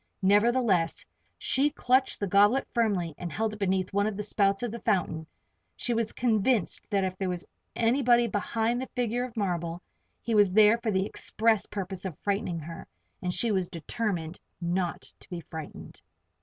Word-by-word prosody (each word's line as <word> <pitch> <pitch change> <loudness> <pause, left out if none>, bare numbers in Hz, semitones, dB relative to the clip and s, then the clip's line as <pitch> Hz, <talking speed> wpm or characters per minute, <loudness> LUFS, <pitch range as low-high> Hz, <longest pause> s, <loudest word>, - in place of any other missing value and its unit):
Nevertheless, 205 -3 +3 0.3
she 275 +3 +2
clutched 260 -2 +1
the 200 - 0
goblet 205 +7 +4
firmly 200 -9 0
and 175 -2 -5
held 220 +5 -1
it 215 - -9
beneath 190 -2 0
one 200 +1 +2
of 210 -2 -3
the 210 - -2
spouts 200 0 +1
of 240 - -2
the 235 - -6
fountain. 170 -8 0 0.5
She 240 - -1
was 230 -1 0
convinced 225 -3 0
that 200 -3 +1
if 185 -1 -2
there 190 -2 -1
was 180 -1 -4 0.3
anybody 240 0 +3
behind 230 +3 -1
the 260 - -5
figure 245 0 0
of 245 -2 -11
marble, 175 -4 -1 0.4
he 230 - -3
was 205 -3 +4
there 215 +2 +6
for 235 -1 -2
the 190 -2 +1
express 220 0 +1
purpose 195 -2 -5
of 185 -6 -5
frightening 195 -4 -1
her 165 +2 -8 0.3
and 180 - -1
she 230 +5 +1
was 185 -3 0
determined 175 -1 -3 0.2
not 175 +1 -1 0.2
to - - -17
be 175 -2 -5
frightened. 160 -2 -9
205 Hz, 175 wpm, -28 LUFS, 180-230 Hz, 0.5 s, there